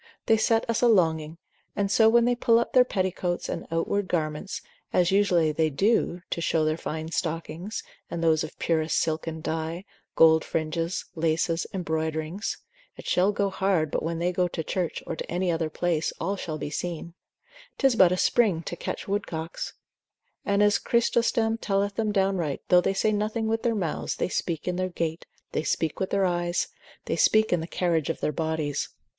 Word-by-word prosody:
they 225 - +5
set 225 +1 +2
us 230 -2 0
a 245 - +5
longing, 160 -6 +2 0.4
and 200 -1 0
so 220 -1 +6
when 235 +1 +5
they 245 - +3
pull 235 -1 +3
up 235 - 0
their 255 - +7
petticoats, 185 -5 -2
and - - -4
outward 185 +4 0
garments, 155 +2 -2 0.3
as 180 0 +3
usually 180 -5 +3
they 155 +1 +1
do 180 +2 +1
to 170 - -1
show 160 -1 +1
their 155 0 +1
fine 160 0 -5
stockings, 165 - -3 0.3
and 170 - -3
those 160 -1 +3
of 155 - -8
purest 160 -1 0
silken 160 0 -1
dye, 160 +4 -3 0.3
gold 160 -1 +6
fringes, 165 +3 -2
laces, 165 +1 0
embroiderings, 160 +1 -2 0.4
(it - - -11
shall 185 +3 +3
go 200 -1 0
hard 185 -6 +1
but - - -1
when 165 +1 -2
they 175 +2 0
go 180 0 +1
to 165 -2 -4
church, 175 +1 -2
or - - -4
to - - -7
any 180 +1 0
other 165 -1 -1
place, 165 0 0
all 200 - -1
shall 160 -5 -4
be 145 - -5
seen) 170 0 -4 0.6
'tis 270 -4 +3
but 185 -5 +6
a 180 - +1
springe 195 -6 +2
to - - -4
catch - - -5
woodcocks; 175 -5 -3 0.7
and 200 0 +2
as 205 0 +4
Chrysostom 230 -1 +1
telleth 200 -1 0
them 215 0 0
downright, 190 -7 0
though 180 0 +6
they 195 - 0
say 215 +2 +2
nothing 215 +2 -1
with 225 0 0
their 235 -2 +1
mouths, 175 -7 -2
they - - -1
speak 170 -3 -2
in 180 0 -1
their 185 0 -1
gait, 165 -2 -3 0.2
they - - 0
speak 155 +1 -1
with 190 - -1
their 195 -1 +2
eyes, 175 -1 0 0.4
they - - -1
speak 220 -2 +4
in 175 - +2
the 160 - -5
carriage 170 -5 0
of - - -2
their - - 0
bodies. 155 -2 -2
175 Hz, 190 wpm, -26 LUFS, 160-200 Hz, 0.7 s, their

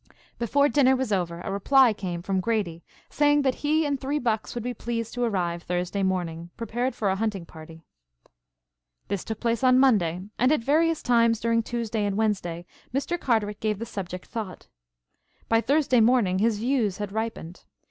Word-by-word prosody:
Before 280 +5 +3
dinner 270 -3 +4
was 260 -3 -2
over 175 -2 -2
a 195 - -5
reply 245 +5 +4
came 175 -4 -5
from 190 0 0
Grady 185 -5 -2 0.3
saying 290 0 +3
that 265 -2 +2
he 310 +2 +2
and 280 -2 -1
three 280 +2 -1
bucks 230 -5 -2
would 240 - -3
be 245 +1 -3
pleased 230 -1 -4
to 245 - -4
arrive 175 -6 -1
Thursday 180 +3 -2
morning 175 -3 -2
prepared 240 +3 -2
for 200 -3 0
a - - 0
hunting 200 -4 -2
party. 160 0 -13 1.3
This 200 -2 -2
took 220 -1 -5
place 235 0 -1
on 255 0 +5
Monday, 185 -10 +3 0.2
and 255 +3 +4
at 305 -7 +1
various 320 +4 +2
times 230 -2 +3
during 230 0 +1
Tuesday 230 -2 -3
and 200 -1 -1
Wednesday, 180 -6 -1 0.3
Mr. 280 +7 -2
Carteret 210 -6 0
gave 215 -2 -1
the 230 - -5
subject 185 -4 -6
thought. 215 -6 -6 0.8
By 225 0 +3
Thursday 275 -2 +2
morning 220 -5 +3
his 220 0 +2
views 230 -4 0
had 205 -1 -4
ripened. 220 -5 -5
225 Hz, 180 wpm, -26 LUFS, 190-250 Hz, 1.3 s, on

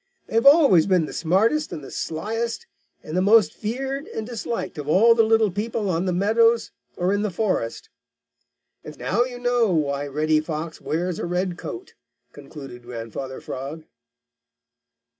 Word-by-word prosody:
They - - -13
have 230 +4 +4
always 280 - +6
been 180 -4 +3
the - - -8
smartest 220 - +1
and 150 - -6
the - - -10
sliest 225 - -3 0.4
and 155 - -6
the 185 - +2
most 205 -3 +5
feared 270 +6 -4
and 220 - -5
disliked 230 -7 -4
of 145 - -6
all 215 +9 +6
the 230 - +4
little 220 -2 +3
people 210 0 -2
on 170 +2 -1
the - - +1
meadows 225 +5 +2 0.3
or 180 +2 +1
in 205 - 0
the 210 - 0
forest. 180 - -2 1.0
And - - -10
now 235 +7 +1
you 250 -1 -7
know 245 -3 +1
why 145 -3 0
Reddy 155 +2 +1
Fox 155 +1 -5
wears 170 +2 -2
a - - -3
red 180 +1 -1
coat," 365 - -8 0.4
concluded 135 -5 -10
Grandfather 120 +2 -7
Frog. 140 +5 -7
190 Hz, 160 wpm, -23 LUFS, 155-230 Hz, 1.0 s, always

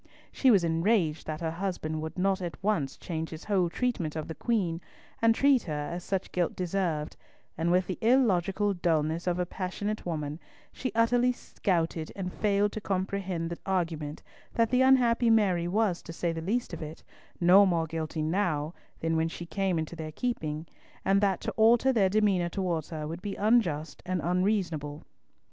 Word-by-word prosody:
She 265 - +3
was 200 -7 +5
enraged 165 -1 +1
that 155 0 -4
her 160 -1 -1
husband 165 -3 -3
would 160 +3 -6
not 190 +1 +1
at 175 -2 -4
once 175 -10 0
change 160 -2 -4
his 160 0 -8
whole 190 -4 +1
treatment 180 -8 -2
of 155 -1 -4
the 160 - -5
Queen, 185 -6 -1 0.4
and 225 0 +5
treat 275 -1 +4
her 150 -3 -3
as 175 0 -5
such 195 0 -2
guilt 175 -2 0
deserved; 175 -4 -2 0.4
and 165 +1 0
with 180 +1 +3
the 185 - -5
illogical 205 -5 +3
dulness 165 -1 0
of 175 -1 +1
a 180 - 0
passionate 205 +4 -4
woman, 155 -2 -3 0.3
she 255 - -3
utterly 245 +2 +3
scouted 170 -9 -2
and 180 -2 -4
failed 205 -1 +1
to 215 - -5
comprehend 190 -3 -2
the 170 - -5
argument 165 -5 -2 0.3
that 230 0 +2
the 255 0 +4
unhappy 245 -3 +4
Mary 190 -6 +3
was, 200 -1 +1
to - - -9
say 170 +1 -1
the 165 0 -4
least 225 +8 -1
of - - -6
it, 155 0 -8 0.4
no 180 +3 +7
more 170 -4 +2
guilty 160 -1 -3
now 160 -2 0 0.3
than 165 0 0
when 160 0 +2
she 170 +1 -7
came 190 0 -1
into 160 +1 -3
their 155 -1 -6
keeping, 155 -9 -3 0.4
and 195 +1 +3
that 195 -3 +2
to - - -2
alter 235 +4 +4
their 200 -5 +3
demeanour 195 -4 +2
towards 170 -4 -2
her 155 -2 -4
would 165 +3 -6
be 200 0 -4
unjust 195 -9 +1
and 185 0 0
unreasonable. 175 -5 0
180 Hz, 180 wpm, -29 LUFS, 160-205 Hz, 0.4 s, no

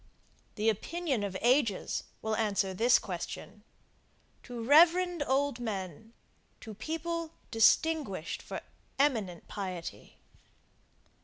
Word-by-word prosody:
The 215 0 -1
opinion 275 - -1
of 195 -2 -3
ages 240 -4 +2 0.2
will 220 0 0
answer 200 -3 0
this 235 +6 +5
question 195 +3 -6 0.8
to 240 -2 -7
reverend 340 +5 +5
old 270 -1 +1
men, 215 -1 -5 0.5
to 220 - -8
people 325 +8 -4 0.2
distinguished 225 - +2
for - - -6 0.4
eminent 220 - 0
piety. 185 -4 -6
225 Hz, 95 wpm, -31 LUFS, 200-295 Hz, 0.8 s, this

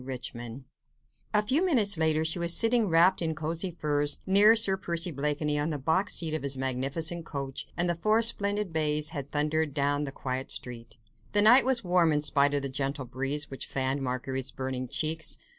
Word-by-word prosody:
RICHMOND 125 -1 -7 0.7
A 210 -1 +2
few 285 - +1
minutes 230 - +2
later 160 -1 +1
she 160 +2 +1
was 170 0 +2
sitting, 230 -1 +3
wrapped 175 +3 +3
in 160 -2 -2
costly 165 +4 -3
furs, 145 -3 -1
near 205 +4 +6
Sir 200 -4 +4
Percy 170 -2 -4
Blakeney 150 +1 -1
on 150 +2 -1
the 150 - -3
box 160 +8 0
seat 160 -2 +2
of 155 - -2
his 140 -1 -3
magnificent 135 +6 -2
coach, 140 -3 -6
and 175 +1 +1
the 175 - +1
four 215 +7 +1
splendid 205 -4 +1
bays 150 0 0
had 140 -4 -6
thundered 150 0 -1
down 145 +1 0
the 135 - -5
quiet 130 -1 -5
street. 115 -2 -4 0.4
The 205 0 +4
night 245 +5 +6
was 255 -3 +2
warm 175 -3 +2
in 150 0 0
spite 145 -1 +2
of 140 - -1
the - - -1
gentle 135 +1 -4
breeze 135 +4 -2
which 135 - -6
fanned 135 +1 -2
Marguerite's 130 +1 -3
burning 130 -1 -5
cheeks. 155 +4 0
155 Hz, 190 wpm, -28 LUFS, 135-175 Hz, 0.7 s, near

